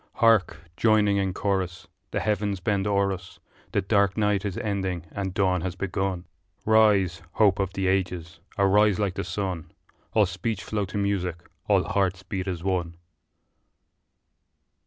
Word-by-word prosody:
Hark! 115 -6 +4 0.2
joining 105 -3 +3
in 95 -1 0
chorus 95 -2 -2 0.2
The - - -2
heavens 105 -2 0
bend 100 +1 0
o'er 100 -1 +2
us' 90 0 -10 0.3
The - - 0
dark 100 0 +2
night 105 -2 +1
is 100 -3 -3
ending 95 -5 -2
and 95 -1 -3
dawn 95 -2 +1
has 90 +1 -3
begun; 95 -1 -2 0.4
Rise, 105 -6 +4
hope 100 -3 +3
of 95 -1 -1
the 95 -1 -2
ages, 90 -3 -1 0.2
arise 100 0 +4
like 100 -3 0
the - - -3
sun, 90 -2 -4 0.4
All 110 -2 +5
speech 95 +1 -3
flow 105 +1 -2
to 90 +2 -6
music, 90 -4 -1 0.2
all - - +4
hearts 95 -1 0
beat 95 0 -4
as 90 -3 -3
one! 90 -3 -1
95 Hz, 150 wpm, -26 LUFS, 90-100 Hz, 0.4 s, All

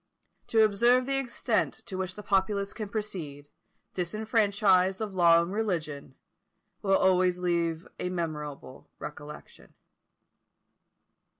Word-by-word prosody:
To 225 -1 +4
observe 235 +5 +3
the 270 0 0
extent 240 -3 -1
to 190 - -6
which 185 -1 -3
the 210 - -9
populace 200 +1 0
can 215 -3 -6
proceed, 165 -10 -5 0.4
disfranchised 200 -1 +2
of 215 -3 -4
law 170 -2 +5
and 175 +3 -5
religion, 160 -11 -3 0.7
will 195 -1 +3
always 185 -1 +3
leave 170 -2 -1
a 180 - -2
memorable 150 -6 -5
recollection. 150 0 -10
190 Hz, 110 wpm, -28 LUFS, 170-210 Hz, 0.7 s, law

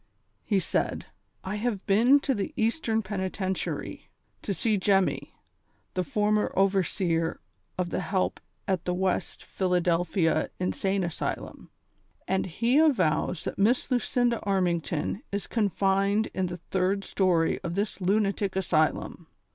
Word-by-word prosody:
He 205 - +1
said: 175 - -1 0.4
"I 190 +2 -3
have 210 -3 -2
been 235 +8 +5
to 275 - +1
the 200 -5 -3
Eastern 225 -1 +1
Penitentiary, 190 -1 -3 0.3
to - - -3
see 215 +3 +1
Jemmy, 195 -1 +1 0.6
the 185 - 0
former 210 +3 +1
overseer 185 -3 +1 0.4
of 180 -2 -2
the - - -1
helj) 190 -2 -1 0.3
at 190 -3 -1
the 180 - 0
West 185 0 -1
Pliiladelphia 175 -2 +1
In 180 - 0
sane 195 0 0
Asylum, 170 -2 -4 0.6
and 190 0 0
he 235 - +2
avows 185 - +2
tliat - - -5
INIiss 235 +7 +2
Lucinda 245 -1 +1
Armington 175 -2 -1
is 200 0 -2
confined 200 0 +1
in 185 -1 0
the 175 0 -5
third 190 +3 -1
story 175 -5 +1
of 170 - -3
tliis 200 0 -2
Lunatic 200 0 +1
Asylum 165 -2 0
195 Hz, 130 wpm, -27 LUFS, 180-210 Hz, 0.6 s, been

